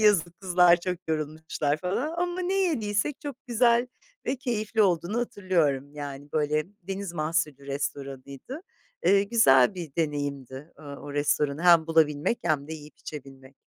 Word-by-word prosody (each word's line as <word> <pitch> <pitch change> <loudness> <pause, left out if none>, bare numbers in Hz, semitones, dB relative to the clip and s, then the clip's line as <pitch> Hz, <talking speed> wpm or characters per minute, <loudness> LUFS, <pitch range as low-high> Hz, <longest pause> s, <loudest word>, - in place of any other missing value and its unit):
yazık, 175 -6 +3
kızlar 180 -2 +5
çok 180 0 -2
yorulmuşlar." 155 -1 -1
falan 190 - -2
ama 355 +1 -1
ne 365 +1 -1
yediysek 285 - 0
çok 290 -5 -6
güzel 240 0 +3 0.4
ve 265 - 0
keyifli 225 -4 0
olduğunu 180 +3 +1
hatırlıyorum, 170 - 0
yani, 145 0 -7
böyle, 150 0 +1 0.2
deniz 195 0 -5
mahsulü 155 -3 -1
restoranıydı. 140 - -5 0.5
Eee, 195 0 +5
güzel 195 - +5
bir 165 -6 -7
deneyimdi, 145 -2 -3
ııı, 145 -2 -8
o 145 0 -8
restoranı 145 +1 0
hem 170 -3 +6
bulabilmek 160 +5 +2
hem 150 -3 0
de - - -5
yiyip 150 -1 -12
içebilmek. 135 -2 -10
165 Hz, 140 wpm, -27 LUFS, 145-205 Hz, 0.5 s, hem